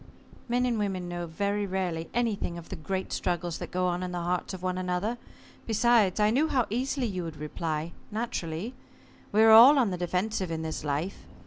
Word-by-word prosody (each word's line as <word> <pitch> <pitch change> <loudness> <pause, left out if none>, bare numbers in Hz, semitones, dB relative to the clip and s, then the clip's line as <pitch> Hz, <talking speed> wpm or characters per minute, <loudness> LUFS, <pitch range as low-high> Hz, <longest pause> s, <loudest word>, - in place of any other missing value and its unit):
"Men 245 +1 +2
and 235 -3 0
women 190 -3 -2
know 175 0 -4
very 200 +5 -1
rarely 180 -4 -2
anything 220 -7 -1
of 170 - -10
the - - -5
great 190 +4 -4
struggles 175 -1 -2
that - - -6
go 180 0 0
on 180 0 0
in 180 -1 -3
the 175 - -3
hearts 180 +1 -1
of 185 -2 -7
one 185 0 -1
another. 185 +6 -2 0.5
Besides, 225 -3 +3
I 210 0 +4
knew 285 +7 +3
how 255 -6 +1
easily 260 +3 -1
you 185 -5 -3
would 165 -2 -6
reply 155 +1 -3 0.2
naturally. 210 -2 -3 0.6
We 215 +2 +5
are 225 - +7
all 245 +7 +10
on 240 -7 +3
the 180 - -2
defensive 185 +2 -1
in 160 -1 -3
this 160 -2 -4
life. 150 +6 -3
185 Hz, 200 wpm, -28 LUFS, 175-220 Hz, 0.6 s, all